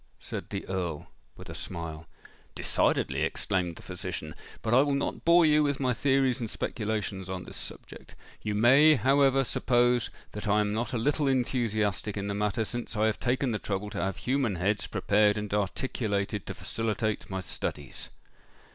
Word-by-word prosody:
said - - -6
the 100 - -5
Earl 90 -5 -3 0.3
with - - -10
a - - -7
smile. 80 -2 -6 0.5
"Decidedly," - - +1
exclaimed 90 -3 -1
the - - -13
physician. 75 -1 -5 0.3
"But 110 - 0
I 130 - +7
will 140 -1 +1
not 140 - -2
bore 170 0 +6
you 150 0 +5
with 145 -2 +1
my 130 -2 +1
theories 135 0 +2
and 115 -3 -3
speculations 105 -4 -3
on 95 -1 -4
this - - -9
subject. - - -8 0.3
You 105 -1 -2
may, 135 +8 +7
however, 135 +2 +4
suppose 120 -1 +2 0.2
that 105 0 -6
I 105 +1 +4
am 105 0 +1
not 120 +4 -2
a - - +1
little 145 +5 +1
enthusiastic 110 -6 0
in 100 0 -2
the 100 - -1
matter, 105 +2 0
since 120 +1 -5
I 110 - +3
have 110 -1 0
taken 125 +1 +1
the 105 - -1
trouble 105 +1 -3
to - - -3
have 95 -1 -2
human 130 -5 0
heads 100 +4 0
prepared 105 +2 +3
and 105 -1 -4
articulated 105 -1 -1
to - - -5
facilitate 110 -1 -2
my 95 -1 -3
studies." 75 -6 -4
110 Hz, 175 wpm, -29 LUFS, 100-130 Hz, 0.5 s, I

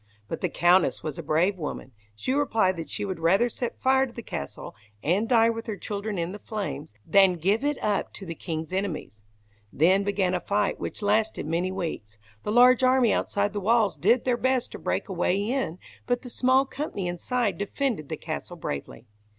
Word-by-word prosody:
But - - -5
the - - 0
Countess 175 +1 +3
was 155 0 -4
a - - -2
brave 170 +5 +1
woman. 150 -3 -5 0.2
She 255 - -2
replied 225 -9 +2
that 165 - -6
she 205 - -2
would 190 -4 -4
rather 195 +9 +3
set 240 +1 -5
fire 265 +1 +3
to - - -12
the 235 0 -8
castle, 70 - -6 0.3
and 195 +9 +1
die 230 -2 +5
with 230 +1 -6
her 215 -2 -3
children 205 0 -4
in 170 +1 -2
the 205 - -8
flames, 195 - -5
than 195 -2 +5
give 195 - +1
it 290 -1 0
up 205 -1 0
to 195 - -8
the 165 - -5
king's 160 0 -5
enemies. 175 - -3 0.5
Then 185 +7 +3
began 195 -2 0
a 180 - +1
fight 205 +3 0
which - - -5
lasted 215 -2 +1
many 170 +4 -1
weeks. 160 - -5 0.2
The - - -3
large 250 +2 +6
army 255 -2 +4
outside 205 0 0
the 205 - -2
walls 215 -2 +3
did 215 - +2
their 250 -2 +2
best 260 0 0
to - - -8
break - - -2
a 195 - -5
way 180 +1 +1
in, 220 -5 -1 0.3
but 245 +1 0
the 250 - -7
small 260 +2 +3
company 265 -9 -4
inside 205 +6 -1
defended 205 - -2
the - - -3
castle - - -6
bravely. 70 - -6
200 Hz, 200 wpm, -26 LUFS, 175-235 Hz, 0.5 s, large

